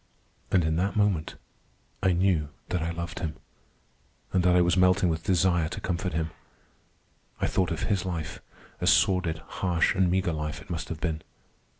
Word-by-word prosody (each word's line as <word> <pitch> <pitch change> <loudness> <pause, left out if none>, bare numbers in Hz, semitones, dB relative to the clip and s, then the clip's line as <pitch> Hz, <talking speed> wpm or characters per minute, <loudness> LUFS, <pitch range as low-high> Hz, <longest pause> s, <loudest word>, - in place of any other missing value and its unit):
And 90 -4 +3
in 80 0 +1
that 95 +5 0
moment 100 -7 +1 0.7
I 95 - +3
knew 85 -4 +2 0.2
that 90 -1 -1
I 85 - -1
loved 85 +1 -5
him, 80 -5 -3 1.0
and 95 - +3
that 90 0 +4
I 90 - +6
was 85 -1 +3
melting 90 0 +4
with 80 0 -2
desire 85 -4 +2
to - - -5
comfort 85 -4 -2
him. 80 0 -1 1.1
I - - +1
thought 90 -3 +1
of 80 - -3
his 100 -4 0
life. 85 -4 -4 0.4
A - - -1
sordid, 90 -4 +3 0.2
harsh, 90 -3 +2
and 95 -2 +2
meagre 90 -1 +1
life 75 0 -3
it 95 - -11
must 85 -1 -4
have 80 - -5
been. 80 -1 -1
85 Hz, 180 wpm, -27 LUFS, 80-95 Hz, 1.1 s, I